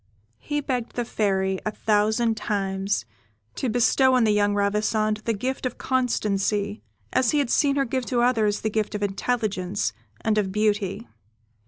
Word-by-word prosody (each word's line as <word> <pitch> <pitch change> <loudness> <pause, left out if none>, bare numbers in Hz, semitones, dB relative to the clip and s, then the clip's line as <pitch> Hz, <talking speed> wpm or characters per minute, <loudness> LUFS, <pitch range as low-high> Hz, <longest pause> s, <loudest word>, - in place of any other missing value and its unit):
He 295 0 -2
begged 250 -4 -3
the 240 - -1
Fairy, 190 -4 0
a - - -1
thousand 220 +2 +1
times, 195 - -1 0.5
to 260 - -2
bestow 255 +3 +3
on 250 - +4
the 215 - +3
young 205 0 +2
Ravissante 210 +1 +1
the 230 - +1
gift 255 +6 -3
of 255 -2 -3
constancy, 210 -5 0 0.3
as 255 -3 +3
he 300 - +2
had 280 -5 +1
seen 280 -2 +3
her 275 -1 +2
give 255 0 -2
to 240 -2 +1
others 220 -4 +2
the 220 - -1
gifts 215 -1 -1
of 205 - -2
intelligence 200 - -1 0.3
and 215 -1 +2
of 195 -2 -1
beauty. 210 0 0
215 Hz, 165 wpm, -24 LUFS, 205-245 Hz, 0.5 s, on